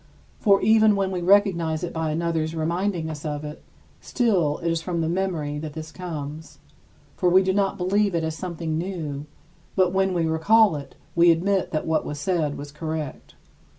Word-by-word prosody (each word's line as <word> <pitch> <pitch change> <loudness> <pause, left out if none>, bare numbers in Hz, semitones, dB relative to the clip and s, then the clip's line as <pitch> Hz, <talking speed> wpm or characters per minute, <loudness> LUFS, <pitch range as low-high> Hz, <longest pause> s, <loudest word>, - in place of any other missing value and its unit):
For 200 -3 +4
even 220 -1 +5
when 195 -1 0
we 180 -2 -2
recognize 175 -4 +3
it 175 - -4
by 160 -1 -1
another's 160 0 -1
reminding 170 +2 -1
us 155 -2 -6
of 150 -1 -4
it, 150 0 -8 0.4
still 185 - +1
it 170 0 -1
is 165 -1 -1
from 170 -1 -2
the 160 - 0
memory 165 -5 -2
that 155 -1 -6
this 160 0 -7
comes, 160 -3 -7 0.6
for 180 - +2
we 185 +2 +5
do 190 0 +1
not 200 0 +1
believe 195 +1 +1
it 165 - 0
as 160 0 -2
something 165 -3 -3
new; 155 -6 -4 0.5
but 185 -1 +3
when 190 -1 +1
we 170 -2 +1
recall 185 +5 +4
it, 140 -2 -8 0.2
we 170 +1 +6
admit 185 +4 +2
that 155 - -2
what 160 -1 +1
was 145 - -5
said 150 -2 -1
was 145 0 -8
correct. 155 -1 -6
170 Hz, 185 wpm, -24 LUFS, 155-190 Hz, 0.6 s, we